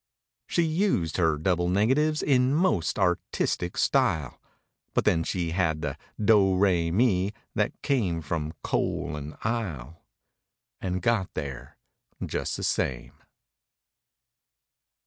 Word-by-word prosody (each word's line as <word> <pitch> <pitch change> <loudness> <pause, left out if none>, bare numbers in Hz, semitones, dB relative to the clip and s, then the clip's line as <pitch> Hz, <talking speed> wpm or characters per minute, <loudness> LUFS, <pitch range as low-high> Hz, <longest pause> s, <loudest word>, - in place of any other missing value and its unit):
She 170 - +1
used 160 - 0
her 80 -4 +2
double 90 +2 +1
negatives 135 +11 +2
in 130 0 +3
most 115 - +1
artistic 90 -1 0
style, 75 -5 +1 0.5
But - - +2
then 80 -2 +3
she 85 -1 -2
had 80 -3 0
the 75 -2 -2 0.2
"do 100 -3 +4
ra 90 -3 +2
me" 100 0 +2 0.2
that - - -1
came 95 - 0
from 80 0 -3
coal 75 - -1
and 75 +1 -7
"ile"— 85 - -3 0.8
And 90 -1 -2
got 110 -5 +1
there 70 -5 -6 0.5
just - - -3
the - - -5
same. - - -1
90 Hz, 115 wpm, -27 LUFS, 80-115 Hz, 0.8 s, do